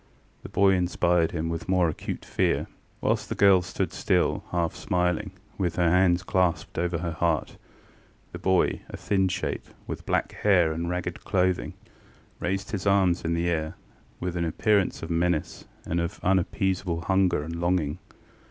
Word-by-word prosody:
The - - -9
boy 100 -1 +4
inspired 90 -2 +2
him 80 -1 -3
with 85 +2 -4
more 90 -2 +3
acute 80 - -5
fear. - - +1 0.4
Whilst - - 0
the - - -2
girl 95 -2 +6
stood 90 - -3
still, - - +1
half 85 -2 0
smiling, 90 +3 0 0.3
with 90 -3 0
her 85 -2 +3
hands 90 -1 +3
clasped 90 -5 0
over 85 0 0
her 85 0 -3
heart, 85 -2 -1 0.8
the - - -7
boy, 95 -1 +2
a - - -7
thin 95 -2 +1
shape, 90 - -3 0.2
with - - -7
black - - 0
hair 90 -6 +3
and 85 +2 -3
ragged 90 -1 -3
clothing, 90 -1 0 0.7
raised 95 +3 -2
his 100 -2 -3
arms 95 -3 +3
in 85 0 0
the 85 +1 0
air 80 -2 -1 0.4
with 90 -1 -3
an 85 -1 0
appearance 100 +4 +1
of 80 - -5
menace 85 -1 0 0.2
and 85 +1 0
of 85 +4 -4
unappeasable 95 -1 0
hunger 95 -3 +2
and 85 +2 -5
longing. 85 -4 0
90 Hz, 160 wpm, -26 LUFS, 85-95 Hz, 0.8 s, girl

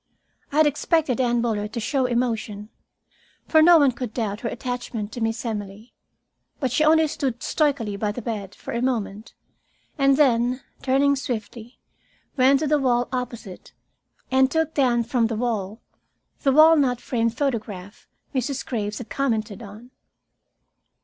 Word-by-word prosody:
I 285 - -2
had 310 - +6
expected 295 -3 +1
Anne 240 -1 +1
Bullard 210 -2 -2
to 235 - -3
show 255 +3 0
emotion, 225 -4 -2 0.8
for 315 - +5
no 340 +2 +8
one 285 -4 +4
could 240 -2 -6
doubt 210 -3 -2
her 235 - -3
attachment 245 -4 -5
to 240 - -7
Miss 225 +2 -2
Emily. 210 0 -6 0.7
But 260 -4 -1
she 280 +5 +2
only 315 +1 +5
stood 275 -6 -3
stoically 275 -9 0
by 210 0 -1
the 235 +2 -7
bed 205 -4 -5
for - - -8
a 235 - -1
moment 225 -4 -3 0.6
and 275 0 +4
then, 250 -2 +2 0.2
turning 280 +2 +3
swiftly, 235 -2 -6 0.6
went 270 +1 +4
to 310 - 0
the 300 0 +2
wall 245 -2 +1
opposite 235 -6 -6 0.6
and 265 0 +4
took 320 +1 0
down 245 -5 +2
from 235 0 +1
the 225 - -3
wall 220 -2 -3 0.6
the 275 - +3
walnut 290 -4 +5
framed 230 -1 -1
photograph 215 -8 -4 0.3
Mrs. 265 +1 -2
Graves 210 -4 -3
had 245 - -9
commented 220 -7 -2
on. 220 +4 -12
245 Hz, 150 wpm, -23 LUFS, 220-275 Hz, 0.8 s, no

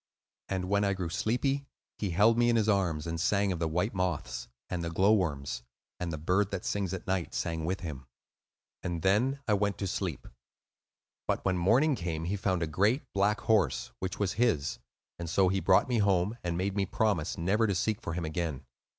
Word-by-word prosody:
And 95 -1 -1
when 100 +2 +2
I 100 -1 +2
grew 90 -3 -3
sleepy, 135 - 0 0.3
he 100 - -1
held 105 +6 +4
me 120 0 +3
in 120 - +3
his 110 -2 +2
arms, 90 -7 +1
and 80 -1 -3
sang 100 +1 +2
of 90 - -2
the 85 - 0
white 90 +8 0
moths, 85 -10 -2 0.2
and 85 -1 -3
the 85 - -2
glowworms; 85 - +1 0.4
and 90 -2 -2
the 80 - -3
bird 90 +6 +1
that 95 -3 -4
sings 100 -3 -1
at 95 - -5
night 95 -2 -1
sang 80 -2 -2
with 95 +3 -2
him; 70 -7 -6 0.7
and 85 -2 -3
then 125 +9 +2
I 105 - +3
went 100 0 +1
to 100 - -2
sleep. 90 -6 -3 1.0
But - - -1
when 95 -1 +2
morning 125 - +4
came 85 -8 -3
he 95 +4 -1
found 95 -3 0
a - - +1
great 100 - +2
black 100 +1 +2
horse, 110 -6 +2
which 95 0 -3
was 100 -2 0
his; 80 - +1 0.4
and 85 -1 -4
so 95 +2 +3
he 95 +1 +1
brought 95 0 +4
me 120 -3 +1
home, 100 +1 +2
and 85 -1 -1
made 95 +2 -1
me 100 -2 0
promise 95 -6 0
never 100 +7 +2
to 100 - 0
seek 110 +4 0
for 85 - -4
him 85 -1 -2
again. 80 -3 -3
95 Hz, 205 wpm, -30 LUFS, 85-105 Hz, 1.0 s, held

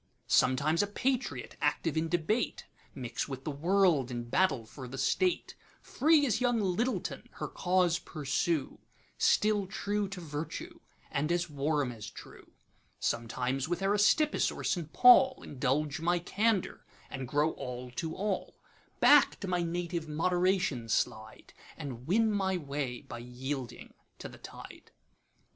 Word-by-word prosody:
Sometimes 145 +6 +3
a 205 - 0
patriot, 215 - -2
active 145 +1 0
in 160 +1 0
debate, 175 +8 -1 0.3
Mix 120 -3 -4
with 135 -2 -6
the 150 - -3
world, 165 -3 +2
and 120 -1 -5
battle 140 -11 +2
for 130 +3 -9
the 130 +2 -7
state; 355 - +1 0.3
Free 300 +2 +3
as 235 -2 0
young 245 -2 +2
Lyttleton, 210 +6 -1
her - - -5
cause 180 -2 +1
pursue, 155 0 -2 0.4
Still 210 -2 +3
true 205 +2 -2
to 195 -1 -7
Virtue, 150 -1 -6 0.3
and 150 +4 0
as 175 -2 0
warm 145 -2 0
as 110 -3 -8
true:Sometimes 125 +4 -5
with 175 +2 -2
Aristippus 210 +10 +3
or - - -7
St. 170 -4 -1
Paul, 260 +1 +6
Indulge 145 +3 -1
my 175 +2 +2
candour, 205 +3 0 0.3
and 135 -2 -5
grow 150 +4 +2
all 125 -2 -7
to 160 +6 -4
all; 200 -1 -2 0.4
Back 290 -1 +6
to 200 - -4
my 180 -1 0
native 170 -1 -3
Moderation 175 -6 +1
slide, 110 0 -2 0.2
And 130 -5 -7
win 220 +5 +3
my 190 -2 0
way 140 -5 -4
by 120 - -8
yielding 125 +1 -6 0.2
to - - -7
the - - -13
tide. - - -11
165 Hz, 140 wpm, -31 LUFS, 135-195 Hz, 0.4 s, Paul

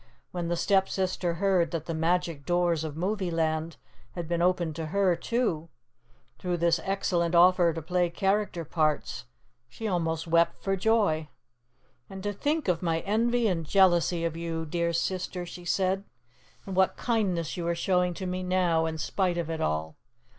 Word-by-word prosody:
When 175 -2 -3
the 175 - 0
Stepsister 190 -2 +1
heard 185 -3 +2
that 165 -1 -4
the 165 - -3
magic 165 -2 0
doors 175 -1 +1
of 155 -1 -5
movie 190 +1 -1
land 160 -1 -1 0.4
had 170 -2 -5
been 170 0 -1
opened 175 -3 +1
to 160 -1 -3
her, 190 +1 +2
too, 170 -5 -1 0.7
through 180 -1 -1
this 170 0 +2
excellent 180 -3 0
offer 175 0 +6
to 165 -1 -6
play 180 +1 +1
character 195 -1 0
parts, 155 -6 -1 0.4
she 220 - -5
almost 165 -4 -1
wept 170 0 +2
for 195 0 +1
joy. 190 -7 +1 0.8
"And 190 -1 -8
to 205 0 -2
think 295 +8 -1
of 175 -3 +1
my 165 -2 0
envy 230 +3 +1
and 175 -5 0
jealousy 175 -1 +3
of 165 -1 -2
you, 165 -1 -3
dear 170 +2 -1
Sister," 180 +1 -2
she 175 0 -10
said, 190 +2 +1 0.6
"and 195 - -5
what 190 0 +3
kindness 190 -9 0
you 170 -2 -3
are 170 - +1
showing 180 0 +1
to 190 - -5
me 185 0 -2
now, 180 -3 +1
in 160 0 -4
spite 180 +2 -1
of 165 -1 -2
it 160 - -3
all!" 80 0 -2
175 Hz, 170 wpm, -28 LUFS, 165-190 Hz, 0.8 s, offer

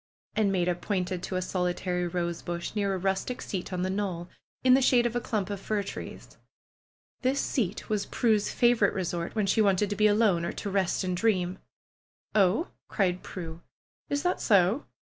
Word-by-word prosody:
And 210 -2 +2
Maida 180 -2 +2
pointed 180 0 -2
to 185 0 -3
s 185 0 -2
solitary 180 -1 -1
rosebush, 170 0 -3
near 200 -2 0
a - - -1
rustic 195 +7 -1
seat 190 -1 -4
on 180 -1 -1
the 185 - 0
knoll, 185 -3 -3 0.3
in 255 0 +6
the 265 - +5
shade 245 -2 +4
of 240 0 -1
a 240 - +1
clump 205 -4 -2
of 200 -1 -4
flr 205 -1 -1
trees. - - -8 0.8
This 265 +2 +1
seat 215 -6 -1
was 210 -2 -1
Prue's 215 -4 +2
favorite 235 -4 +3
resort 175 -1 -3
when 215 -2 +1
she 195 +3 +3
wanted 200 0 +2
to - - 0
be 215 +1 +4
alone 205 -5 +3
or - - -2
to 200 - -4
rest 190 -1 +1
and 185 -1 -1
dream. 185 -2 +1 0.7
"Oh!" 205 - +3 0.2
cried 185 -3 0
Prue. 165 -2 -7 0.5
"Is 285 0 -1
that 360 - 0
so?" 200 +4 +3
195 Hz, 180 wpm, -28 LUFS, 180-215 Hz, 0.8 s, in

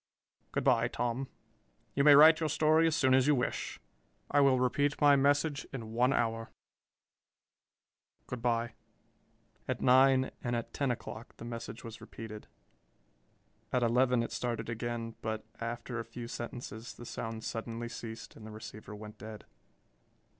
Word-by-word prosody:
Good - - -1
by, 120 -3 +4
Tom. 120 +2 -2 0.7
You 140 - +2
may 145 -1 +9
write 155 +3 +8
your 160 -2 0
story 155 +2 +4
as 160 - +1
soon 130 -5 +3
as 130 +1 +4
you 150 - +5
wish. 125 - -2 0.5
I 145 - +4
will 135 -2 +5
repeat 140 +3 +1
my 145 -1 +6
message 145 +1 +2
in 115 -4 -6
one 125 +3 +3
hour. 115 -3 0 1.8
Good 125 -2 -6
by!" 120 -1 0 0.9
At - - -2
nine 130 +1 +5
and 120 -1 -1
at 115 - -4
ten 140 -2 0
o'clock 115 -2 -6
the - - -9
message 115 -1 -7
was 115 0 -9
repeated. 110 -1 -9 1.2
At 125 -1 +2
eleven 125 +1 +3
it - - -5
started 115 -2 -3
again 115 0 -4
but 110 0 -3
after 120 +1 -4
a - - -3
few 115 +1 -8
sentences 120 -1 -7
the 120 - -10
sound 115 -1 -5
suddenly 115 +1 -4
ceased 115 -1 -8
and 110 - -13
the 110 - -8
receiver 105 -1 -9
went 105 0 -10
dead. 110 0 -9
120 Hz, 155 wpm, -32 LUFS, 115-135 Hz, 1.8 s, may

